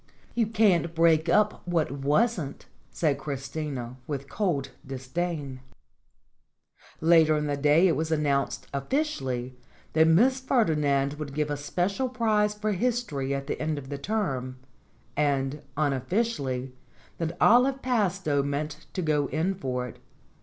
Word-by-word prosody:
"You 230 -2 +1
can't 195 -7 +2
break 165 0 +4
up 210 +4 +3
what 170 -5 +1
wasn't," 145 - 0 0.2
said 150 -4 0
Chris 135 -2 -5
tina 135 -6 -5
with 140 -2 -4
cold 165 -7 -1
disdain. 135 +1 -4 1.4
Later 160 -1 +5
in 150 - -1
the 145 -1 0
day 150 +5 +4
it 165 - +2
was 160 0 -2
announced, 145 -3 0
officially, 135 - -2 0.4
that 160 0 +5
Miss 245 +11 +4
Ferdinand 150 - +1
would 140 -2 -6
give 150 -1 0
a - - 0
special 185 - -1
prize 215 -4 +1
for 210 0 -1
history 190 - -1
at 135 0 -4
the 145 - -4
end 155 -1 -1
of 135 -2 -7
the 140 -1 -4
term; 135 - -2 0.6
and, 140 -1 0 0.2
unofficially, 140 - -1 0.5
that 165 0 -3
Olive 260 +3 +4
Pastowe 190 - +1
meant 150 +2 -4
to 185 - -2
go 150 -3 +1
in 160 +8 0
for 125 -9 -3
it. - - -12
155 Hz, 140 wpm, -27 LUFS, 140-195 Hz, 1.4 s, Later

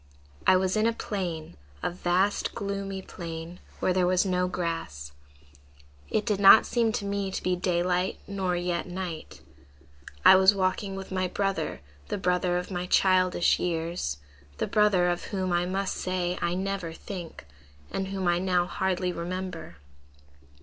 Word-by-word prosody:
"I 185 - +7
was 185 +1 0
in 215 +1 +3
a 230 - +1
plain; 175 - -4 0.3
a - - 0
vast, 180 +3 0
gloomy 195 -1 -4
plain, 165 0 -7 0.2
where 185 - +1
there 180 -1 +2
was 185 +1 +3
no 180 -1 +1
grass. 165 - -4 1.0
It 215 - 0
did 210 -4 0
not 200 +2 +9
seem 230 -2 +1
to 200 - -2
me 200 -1 -1
to 190 - -4
be 180 0 +1
daylight 180 +1 0
nor 190 -3 -1
yet 175 0 -2
night. 175 -3 -6 0.8
"I 190 - +10
was 190 +2 +6
walking 195 +1 -1
with 195 0 -7
my 185 0 0
brother, 195 - -2 0.3
the - - -2
brother 180 -1 +1
of 180 +2 -4
my 180 0 -3
childish 185 -2 +3
years, 165 - -2 0.4
the - - 0
brother 205 -4 +3
of 175 0 -1
whom, 185 -3 -2
I 175 +1 +1
must 190 +1 -1
say, 180 -1 -1
I 170 +1 0
never 190 -3 -3
think, 175 - -8 0.5
and 195 - -2
whom 190 -1 -2
I 175 0 +3
now 180 -1 +2
hardly 180 0 -1
remember. 175 - -5
185 Hz, 155 wpm, -27 LUFS, 175-195 Hz, 1.0 s, I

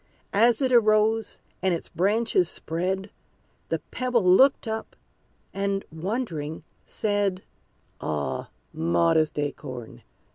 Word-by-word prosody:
As 230 +4 +4
it 260 - +1
arose, 220 -1 +3 0.2
and 185 -2 +2
its 165 - -6
branches 200 -1 +1
spread, 190 +5 -3 0.6
The - - +1
Pebble 250 -3 +1
looked 230 +9 +5
up, 220 0 -4 0.6
and, 195 0 -1
wondering, 160 - -3 0.2
said, 205 -3 -1 0.6
"Ah, 75 -2 -3 0.2
modest 85 - +2
Acorn! 130 -5 -5
195 Hz, 100 wpm, -26 LUFS, 160-220 Hz, 0.6 s, looked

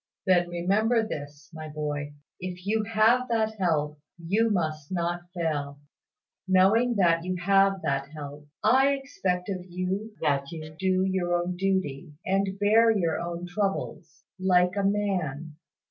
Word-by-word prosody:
"Then 175 -2 +3
remember 215 +7 +1
this, 145 -2 -8
my 155 -1 -7
boy. 150 -1 -4 0.3
If 180 0 -6
you 215 +1 +1
have 225 +4 +3
that 220 -2 0
help, 150 -4 0 0.2
you 200 +7 +1
must 155 -6 -2
not 175 0 -2
fail. 145 -4 -2 0.7
Knowing 205 +6 +4
that 170 -4 +3
you 185 +1 -2
have 195 +1 +3
that 140 0 -1
help, 145 -1 -9 0.2
I 265 +6 +5
expect 190 -10 -2
of 185 -2 -3
you 190 +5 -3
that 140 -3 0
you 155 -2 -8
do 185 0 +2
your 185 -2 0
own 175 +1 -1
duty, 180 -6 -1
and 195 0 0
bear 220 +3 +5
your 180 -7 +1
own 170 0 -4
troubles, 195 -1 -3 0.2
like 180 -1 +3
a 200 - 0
man. 180 -7 -1
180 Hz, 145 wpm, -27 LUFS, 160-200 Hz, 0.7 s, I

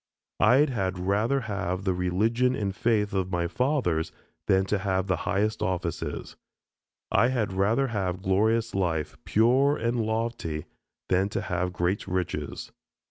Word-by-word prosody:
I 125 - +6
had 95 -9 -2
rather 105 +9 +1
have 100 -4 -3
the 95 -2 +1
religion 110 +8 +1
and 100 -2 -2
faith 110 -2 +1
of 95 -2 0
my 85 -1 0
fathers 125 - 0 0.4
than 95 0 +3
to 105 +1 0
have 95 -1 0
the 95 -2 +1
highest 105 +2 0
offices. 90 -3 -3 0.8
I 115 - +4
had 120 -6 -1
rather 110 +8 +2
have 95 -4 -2
glorious 110 +4 +2
life, 85 -5 -1
pure 130 +6 +3
and 115 +1 -1
lofty, 110 -8 -2 0.4
than 95 +2 +2
to - - -2
have 90 0 -2
great 90 +3 -1
riches. 90 -6 -3
100 Hz, 140 wpm, -27 LUFS, 90-115 Hz, 0.8 s, I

